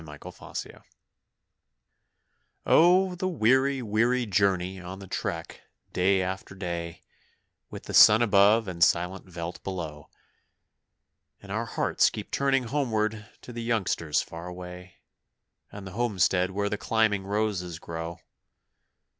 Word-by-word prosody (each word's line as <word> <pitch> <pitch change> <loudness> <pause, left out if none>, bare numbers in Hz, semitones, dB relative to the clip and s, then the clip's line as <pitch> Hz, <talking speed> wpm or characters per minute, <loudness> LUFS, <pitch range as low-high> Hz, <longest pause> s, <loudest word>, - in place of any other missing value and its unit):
On - - -13
the 75 0 -10 0.4
Trek - - -7 1.8
Oh, 180 +3 +5
the 180 +1 -3
weary, 130 -3 +2
weary 120 +3 +1
journey 95 -2 0
on 90 +1 -8
the 100 - -10
trek, - - -5 0.3
day 95 +1 +2
after 95 +1 -5
day, 85 -3 -5 0.7
With - - -7
sun 110 +3 +8
above 105 +1 +4
and 85 -2 0
silent 90 +4 +1
veldt 85 0 -7
below; 80 -6 -6 1.3
And - - -12
our - - -2
hearts - - +2
keep - - -8
turning 135 -1 +1
homeward 110 -4 -1
to 125 - -10
the 120 - -5
youngsters 100 -9 0
far 85 +2 -9
away, 90 0 -9 0.8
And 100 -1 -9
the 95 - -8
homestead 95 -4 +1
where 100 +2 -2
the 105 0 -3
climbing 110 -3 +1
roses 100 -4 -2
grow. 85 +1 -7
100 Hz, 125 wpm, -27 LUFS, 90-115 Hz, 1.8 s, sun